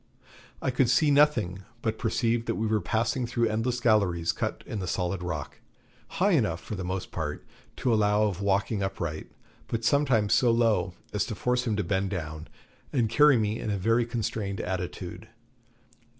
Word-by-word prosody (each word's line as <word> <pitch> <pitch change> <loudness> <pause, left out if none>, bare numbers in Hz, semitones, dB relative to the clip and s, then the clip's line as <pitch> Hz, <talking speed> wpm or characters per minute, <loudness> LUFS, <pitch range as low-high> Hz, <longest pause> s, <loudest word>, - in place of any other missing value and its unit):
I 130 - +1
could 125 -1 +2
see 150 -2 +4
nothing, 125 -11 +3 0.2
but 110 -1 -1
perceived 115 0 0
that - - 0
we 110 - -1
were 110 -1 +1
passing 115 +6 0
through 120 -1 +1
endless 115 +3 -1
galleries 100 -8 +2
cut - - -3
in 110 - -4
the 90 - -4
solid 90 +1 -1
rock, 80 -5 -5 0.6
high 200 +3 +3
enough, 110 - +2
for 110 - -8
the 95 -3 -4
most 95 +1 -4
part, 75 -3 -4 0.3
to 125 - +1
allow 105 -1 +3
of 100 -3 -1
walking 100 +1 +1
upright, 85 -5 -3 0.4
but 115 0 -3
sometimes 120 -6 +3
so 125 - +4
low 110 -7 +2 0.2
as 105 - +1
to 110 - -5
force 125 +3 0
him 110 - +1
to 105 - 0
bend 95 +2 0
down 80 -4 -5 0.4
and 115 -5 +1
carry 145 +1 +6
me 110 +1 0
in - - -4
a 100 - 0
very 115 +5 +2
constrained 110 -4 -3
attitude. 90 +2 -5
110 Hz, 180 wpm, -27 LUFS, 95-120 Hz, 0.6 s, carry